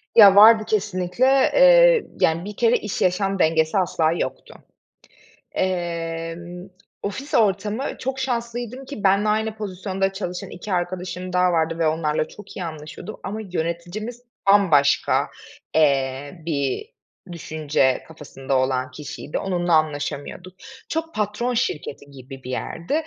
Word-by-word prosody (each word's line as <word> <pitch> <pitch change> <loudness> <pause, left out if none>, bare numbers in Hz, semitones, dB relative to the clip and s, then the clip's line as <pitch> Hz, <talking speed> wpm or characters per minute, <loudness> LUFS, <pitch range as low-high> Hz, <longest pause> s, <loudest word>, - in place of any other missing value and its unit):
Ya, 200 -4 +9
vardı 215 +2 +8
kesinlikle. 195 +1 0 0.3
Eee, - - +6 0.2
yani, 165 +2 +2
bir 210 0 -7
kere 235 0 +3
iş 210 - -5
yaşam 195 +2 +1
dengesi 160 +2 +2
asla 165 -4 +1
yoktu. 170 - -4 1.0
Emm, 170 0 -3 0.3
ofis 265 +8 -5
ortamı 210 +3 +1 0.2
çok 265 +1 -3
şanslıydım 240 0 -3
ki 265 -6 -8
benimle 200 +2 +3
aynı 220 0 0
pozisyonda 195 -2 -3
çalışan 180 -2 -5
2 190 +3 -6
arkadaşım 180 0 -3
daha 180 0 +3
vardı 165 0 0
ve 165 - +3
onlarla 155 -1 0
çok 210 - -12
iyi 185 - -3
anlaşıyordum 155 +5 -8
ama 210 +3 -4
yöneticimiz 180 +6 -4 0.3
bambaşka, 170 -9 +4 0.5
eee, 140 +1 +1
bir 145 - -2 0.4
düşünce 155 -5 0
kafasında 135 -4 -4
olan 130 0 0
kişiydi, 150 +1 -6
onunla 175 -2 -1
anlaşamıyorduk. 155 +3 -2 0.4
Çok 325 +1 -3
patron 215 +4 -1
şirketi 155 - -2
gibi 135 0 -11
bir 125 - -8
yerdi 165 - -4
180 Hz, 125 wpm, -22 LUFS, 160-210 Hz, 1.0 s, Ya